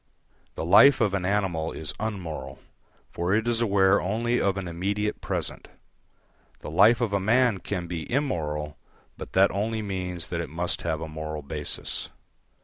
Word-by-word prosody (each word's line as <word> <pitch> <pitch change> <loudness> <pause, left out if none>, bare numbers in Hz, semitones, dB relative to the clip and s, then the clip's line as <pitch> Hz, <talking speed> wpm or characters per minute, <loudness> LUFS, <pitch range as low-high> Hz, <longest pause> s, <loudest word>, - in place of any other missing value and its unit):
The - - -3
life 140 +10 +7
of 105 -4 +2
an 95 -2 -1
animal 90 -5 0
is 80 -2 -4
unmoral, 95 -7 -5 0.5
for 90 +3 0
it 110 +2 0
is 120 -1 +1
aware 100 -3 +4
only 115 +6 0
of 100 0 +1
an 95 -2 -4
immediate 100 +5 -2
present; - - -4 0.9
the - - -7
life 110 +8 +5
of 110 -4 0
a 100 - +2
man 115 +1 +3
can 90 -3 -4
be 85 +2 -5
immoral, 75 - -2 0.4
but - - -9
that 95 +1 +5
only 110 +2 -2
means 90 -3 -4
that 85 -1 -2
it 85 - -6
must 85 +2 -1
have 80 -2 -2
a 80 - -4
moral 80 -1 -5
basis. 75 +1 -4
95 Hz, 165 wpm, -26 LUFS, 85-105 Hz, 0.9 s, life